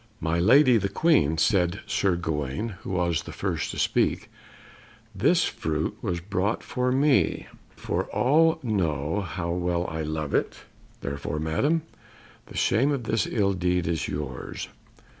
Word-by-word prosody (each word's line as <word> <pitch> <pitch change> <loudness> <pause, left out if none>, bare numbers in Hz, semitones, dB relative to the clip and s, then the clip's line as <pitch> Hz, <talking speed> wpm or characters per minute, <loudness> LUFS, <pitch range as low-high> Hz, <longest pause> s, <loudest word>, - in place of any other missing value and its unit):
"My 85 +1 0
lady, 130 - +6
the 100 -2 -1
Queen," 100 - +3
said 90 -1 +2
Sir 95 -3 +1
Gawaine, 80 - -2
who - - -8
was 90 -3 0
the - - -9
first - - -2
to - - -6
speak, - - 0 0.8
"this - - +3
fruit 80 0 -2
was 85 -1 -2
brought 95 +3 -1
for 125 0 -1
me, 135 +1 +2 0.3
for - - -2
all 160 +5 +3
know 85 - 0
how 85 -2 -4
well 90 0 -1
I 80 -2 -4
love 75 -2 -3
it; - - -1 0.4
therefore, 70 +2 -4
Madam, 135 - 0 0.6
the - - -9
shame 135 +7 +2
of 135 -4 -2
this 110 0 0
ill 100 -4 +1
deed 90 -1 0
is 80 -2 -1
yours." 75 0 -5
90 Hz, 145 wpm, -26 LUFS, 80-115 Hz, 0.8 s, lady